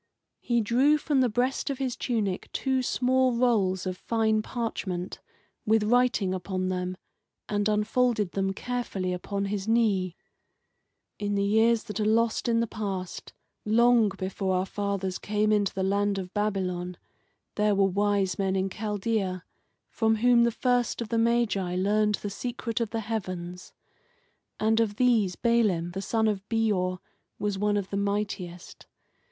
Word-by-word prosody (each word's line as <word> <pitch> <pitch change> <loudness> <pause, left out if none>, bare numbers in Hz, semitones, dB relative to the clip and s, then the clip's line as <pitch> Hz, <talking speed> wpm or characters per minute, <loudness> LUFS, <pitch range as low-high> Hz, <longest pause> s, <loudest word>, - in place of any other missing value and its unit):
He 235 -1 +1
drew 260 +8 +3
from 295 -3 +1
the 250 - +3
breast 250 +6 0
of 275 - -2
his 260 -2 -2
tunic 210 -7 -2
two 265 -1 0
small 255 0 +2
rolls 210 -7 +1
of 185 -1 -3
fine 220 -1 +1
parchment, 200 -6 -4 0.4
with 220 0 +3
writing 240 -4 +2
upon 185 0 -2
them, 180 0 -3 0.5
and 205 0 0
unfolded 215 -1 +1
them 195 0 0
carefully 195 -5 -3
upon 200 +2 -3
his 200 0 -3
knee. 205 -6 +2 1.0
"In 205 0 -1
the 200 - +1
years 220 +3 +3
that 215 -1 -6
are - - +1
lost 225 +2 +1
in 230 -1 +2
the - - +1
past, 195 -5 -5 0.3
long 235 0 +4
before 190 0 -2
our 185 +1 +1
fathers 195 -2 -3
came 210 +1 0
into 205 -2 +2
the 190 - -3
land 200 +1 +1
of 185 -1 -6
Babylon, 185 -4 -2 0.6
there 210 -1 +2
were 195 0 +4
wise 200 -1 +1
men 190 -1 +1
in 190 0 0
Chaldea, 205 -3 -2 0.4
from 225 -1 +1
whom 235 +1 +4
the - - +3
first 245 +1 0
of 220 - -10
the 230 - +1
Magi 225 -6 +1
learned 210 +3 +2
the 205 - -5
secret 235 +1 -3
of 230 - -1
the 225 0 -3
heavens. 185 -5 -5 0.9
And 220 +1 +2
of 215 -3 +1
these 220 -7 +2
Balaam 210 -8 +1
the 190 +2 -4
son 220 +2 +1
of 205 -3 0
Beor 205 -5 +1 0.4
was 205 -2 -2
one 205 0 +1
of 195 -2 -3
the 200 - -1
mightiest. 200 -3 -4
210 Hz, 155 wpm, -27 LUFS, 190-230 Hz, 1.0 s, long